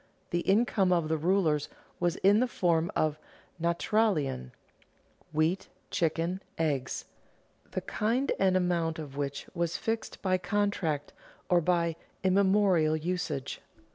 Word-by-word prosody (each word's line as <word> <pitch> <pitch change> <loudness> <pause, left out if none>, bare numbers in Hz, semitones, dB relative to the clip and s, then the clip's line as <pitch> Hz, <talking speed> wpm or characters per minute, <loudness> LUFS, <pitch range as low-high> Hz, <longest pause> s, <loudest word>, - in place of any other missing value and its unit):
The 175 - +1
income 195 -1 +2
of 170 -3 +2
the 160 - +1
rulers 165 -3 +2 0.3
was 175 -1 +1
in 200 +3 +4
the 255 - +2
form 170 -6 +1
of 155 -1 +1 0.4
"Naturalien" 170 - +1 0.8
(wheat, 160 +4 +1 0.2
chickens, 170 +3 0 0.2
eggs), 145 -6 -1 0.6
the - - -3
kind 235 +6 0
and 190 -1 +4
amount 170 -3 0
of 145 -4 -7
which 140 -1 -3
was 170 -1 -1
fixed 225 0 -3
by 185 -1 +2
contract 180 -6 -1 0.4
or 175 -2 +4
by 170 -1 +1 0.3
immemorial 190 -4 +4
usage. 160 -5 -3
175 Hz, 120 wpm, -30 LUFS, 155-195 Hz, 0.8 s, in